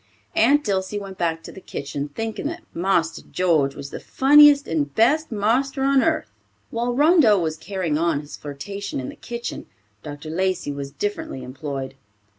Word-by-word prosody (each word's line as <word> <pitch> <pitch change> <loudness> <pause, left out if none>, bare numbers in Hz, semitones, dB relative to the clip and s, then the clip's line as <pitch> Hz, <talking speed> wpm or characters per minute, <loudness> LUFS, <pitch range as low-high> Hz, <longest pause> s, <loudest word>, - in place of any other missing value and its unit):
Aunt 285 +6 +4
Dilsey 190 -1 -1
went 195 -2 -7
back 165 -1 -1
to - - -9
the 190 - -12
kitchen, 140 -2 -5
thinking 225 - -4
that 335 +3 -6
"Marster 170 -2 0
George 155 -7 +1
was 140 -1 -8
the - - -6
funniest 290 +1 +6
and 145 -3 -1
best 300 +8 +3
marster 250 +6 +1
on 275 0 +4
earth." 320 +1 0 0.4
While 240 +1 -1
Rondeau 290 - +5
was 160 -3 -1
carrying 165 -2 -2
on 170 -3 +1
his 145 - -10
flirtation 150 +8 -6
in 130 - -5
the - - -9
kitchen, 235 0 -6 0.3
Dr. 145 +3 -8
Lacey 185 -3 -1
was 140 -1 -5
differently 170 -6 -4
employed. 135 0 -5
190 Hz, 165 wpm, -23 LUFS, 150-240 Hz, 0.4 s, funniest